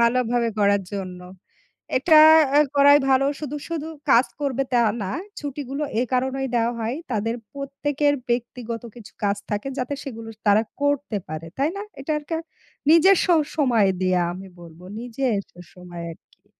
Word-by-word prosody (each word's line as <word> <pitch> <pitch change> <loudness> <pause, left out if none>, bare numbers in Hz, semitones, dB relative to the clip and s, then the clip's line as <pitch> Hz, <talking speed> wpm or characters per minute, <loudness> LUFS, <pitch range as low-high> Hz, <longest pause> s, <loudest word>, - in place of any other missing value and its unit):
ভালোভাবে 235 0 +2
করার 200 -1 +3
জন্য। 185 -2 -5 0.8
এটা 310 +3 +6 0.6
করাই 285 +1 +7
ভালো। 265 +1 +4
শুধু, 295 -1 -4
শুধু 320 -2 -4 0.2
কাজ 240 +3 +6
করবে 275 -2 0
তা 245 - +4 0.2
না। 190 - -3 0.3
ছুটিগুলো 285 0 -5 0.2
এ - - +3
কারণেই 265 +1 0
দেওয়া 235 +1 +1
হয় 230 +4 -2 0.2
তাদের 225 +2 -1 0.2
প্রত্যেকের 285 +1 -1 0.2
ব্যক্তিগত 235 -1 -3
কিছু 225 -3 -12
কাজ 200 0 +1
থাকে 210 +6 -2
যাতে 255 +3 -2
সেগুলো 230 -4 -7 0.2
তারা 205 +1 +5 0.2
করতে 285 -5 0
পারে। 155 +1 -6
তাই 285 +3 +2
না? - - -4 0.2
এটা 290 +3 -2
আর 295 - -12
কা 325 - 0 0.5
নিজের 355 +4 +7
স - - -1 0.3
সময় 240 -9 +3
দিয়ে 185 -1 +2
আমি 190 +2 -9
বলব 170 -1 -13 0.2
নিজের 245 -3 -1 0.3
সময় 175 -2 -9
আরকি। - - -22
245 Hz, 150 wpm, -23 LUFS, 205-280 Hz, 0.8 s, করাই